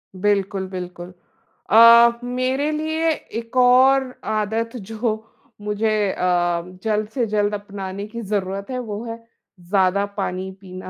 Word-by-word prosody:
बिल्कुल, 195 0 0
बिल्कुल। 180 -1 -7 0.6
अ, 235 +1 +7
मेरे 255 +4 -1
लिए 315 +1 -1
एक 230 -5 -6
और 255 +1 +5 0.2
आदत 220 +2 -1
जो 220 +1 -4 0.3
मुझे 210 +1 -1 0.2
अ, 175 -2 +1 0.2
जल्द 215 -1 0
से 240 +1 -1
जल्द 205 0 0
अपनाने 200 -1 -6
की 235 +2 -7
ज़रूरत 200 -1 -3
है, 255 - -2
वो 220 -3 -5
है, 230 -1 -5 0.5
ज़्यादा 195 0 +2
पानी 190 -1 -3
पीना। 185 -1 -9
215 Hz, 125 wpm, -21 LUFS, 195-235 Hz, 0.6 s, अ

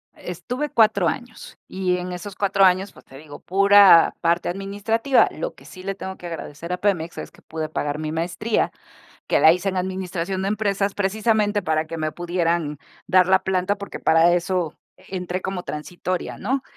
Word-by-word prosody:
Estuve 245 - -5
4 215 -6 +3
años, 245 +4 -6
y 185 -1 -1
en 180 0 -5
esos 180 +2 -7
4 195 -1 +3
años, 185 +2 +2
pues, - - -18
te 135 - -14
digo, 145 0 -11
pura 200 -2 +6
parte 170 +1 +1
administrativa, 205 +7 +1
lo - - -5
que - - -19
sí 185 - -12
le 195 +1 -2
tengo 190 -1 -7
que - - -12
agradecer 165 0 -6
a - - -2
Pemex 175 -5 -1
es - - -7
que - - -22
pude 155 -1 -5
pagar 145 -1 -3
mi 155 0 -3
maestría, 175 +7 -1 0.6
que - - +2
la 160 - +8
hice 185 +2 -1
en 185 - -6
administración 185 0 -3
de 195 - -1
empresas, 200 -1 0
precisamente 210 +1 +1
para 160 0 0
que 165 +1 -6
me 155 -1 -2
pudieran 170 -3 -1 0.3
dar 185 -1 +5
la 190 0 +4
planta, 190 +1 0
porque 200 0 -7
para 165 +2 +4
eso 175 -2 -1 0.2
entré 180 -1 -5
como 190 -1 -4
transitoria, 175 +3 -4
¿no?, 260 +6 -1
185 Hz, 185 wpm, -22 LUFS, 170-200 Hz, 0.6 s, la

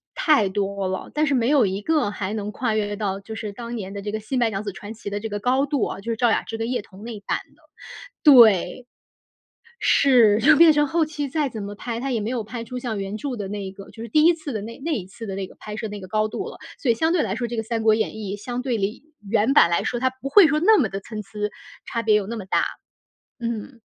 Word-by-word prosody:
太 280 - +3
多 200 -1 -2
了， 190 - -4
但 305 0 +1
是 275 - +2
没 235 -1 +1
有 280 -7 +5
一 195 +2 -3
个 305 -5 +1
还 205 0 -4
能 210 -1 -3
跨 225 0 -1
越 205 -1 -1
到 200 -2 -2
就 220 +3 -8
是 215 -2 -5
当 235 +1 -6
年 195 -3 -6
的 200 - -5
这 205 +1 -4
个 215 - -3
《新 255 +3 -2
白 235 -2 +3
娘 200 0 -4
子 200 - -4
传 205 +4 -9
奇》 205 -2 -7
的 205 - -2
这 220 +1 -5
个 205 0 -3
高 260 +5 +2
度 275 -4 0
啊， - - -5
就 230 +4 -4
是 - - -1
赵 240 -2 +3
雅 - - +2
芝 225 - -6
跟 225 +2 -2
叶 245 - -1
童 200 0 -15
那 225 -3 -6
版 - - -1 0.2
的， - - -29 0.6
对。 235 - +6 1.0
是， 235 -6 +5
就 295 +6 +6
变 330 0 +8
成 295 -1 +2
后 320 +1 +1
期 295 -2 -4
再 290 0 -1
怎 220 -3 -6
么 205 +1 -6
拍， 230 +1 -5
它 270 +2 -3
也 230 -4 0
没 215 - -2
有 235 -4 -2
拍 230 +1 -6
出 250 +1 -6
像 230 -4 -3
原 195 +2 -4
著 265 +1 -4
的 200 -3 -5
那 205 0 -4
一 190 - -6
个， 195 0 -12
就 225 - -11
是 230 - -5
第 305 +4 +4
1 340 +1 +6
次 315 -4 -6
的 215 - -3
那 230 +4 -8
那 330 - 0
一 200 -9 -3
次 215 +4 -10
的 190 - -4
那 195 -1 -3
个 - - -17
拍 210 0 -7
摄 220 -1 -4
那 205 0 -6
个 185 - -9
高 215 +2 0
度 - - -4
了， - - -11 0.2
所 265 - -1
以 230 - +4
相 320 +4 +1
对 345 - +2
来 200 -2 -1
说 240 - -2
这 235 0 -4
个 - - +1
《三 225 -1 -2
国 220 -1 +5
演 220 0 -1
义》 205 -2 -5
相 245 +3 -4
对 250 -3 -1
于 210 +7 -3 0.3
原 225 +4 +2
版 170 - +6
来 170 - +1
说， 240 - -2
它 260 +1 +2
不 260 +1 -7
会 395 -2 +8
说 305 +1 +1
那 430 +3 +6
么 235 - +3
地 195 0 -6
参 215 0 -6
差， 200 - -16 0.6
差 230 - -2
别 215 -2 +3
有 205 -2 +1
那 230 +2 -5
么 195 - -7
大。 - - +1 0.8
嗯。 235 +1 -5
225 Hz, 305 characters per minute, -23 LUFS, 205-255 Hz, 1.0 s, 变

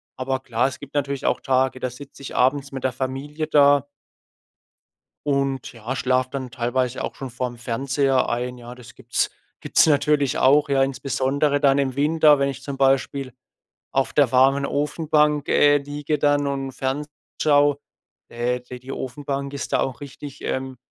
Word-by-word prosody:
Aber 130 +1 -2
klar, 125 -1 0
es - - -10
gibt 145 -1 -11
natürlich 140 -1 -2
auch - - +1
Tage, 130 -1 +1
da 130 - -1
sitze 140 +3 -12
ich 135 - -7
abends 135 +2 +2
mit 135 -1 -5
der 130 - 0
Familie 135 +4 -4
da 145 -2 +5 1.4
und 135 -2 -1
ja, 115 +2 -5
schlafe 130 0 +1
dann 130 -2 -5
teilweise 125 +2 -1
auch - - -4
schon 135 - -7
vorm 125 0 -4
Fernseher 135 +3 0
ein, 125 +1 -2
ja. 120 +1 -10
Das 125 -1 -14
gibt's 120 -1 -1 0.3
gibt's - - +4
natürlich 145 -1 +2
auch, 145 +3 +4
ja. 135 -1 +3
Insbesondere 135 +2 0
dann 140 -1 +4
im 135 -2 0
Winter, 150 +1 +4
wenn 140 0 +1
ich 135 -1 -6
zum 140 -1 -6
Beispiel 135 -1 +1 0.6
auf 135 0 0
der 140 -5 +3
warmen 135 +2 +4
Ofenbank, 150 0 +1
äh, 145 0 +5
liege 145 +1 -3
dann 145 0 +2
und 135 -1 -3
Ferns 135 +3 -3 0.3
schau, 145 -1 +4 0.5
äh 120 +1 -1
die 125 0 -10
die 130 +2 -9
Ofenbank 140 +2 -4
ist 140 - -5
da - - +3
auch 130 0 -3
richtig, 140 0 -9
ähm, 130 0 -3
135 Hz, 170 wpm, -23 LUFS, 130-145 Hz, 1.4 s, da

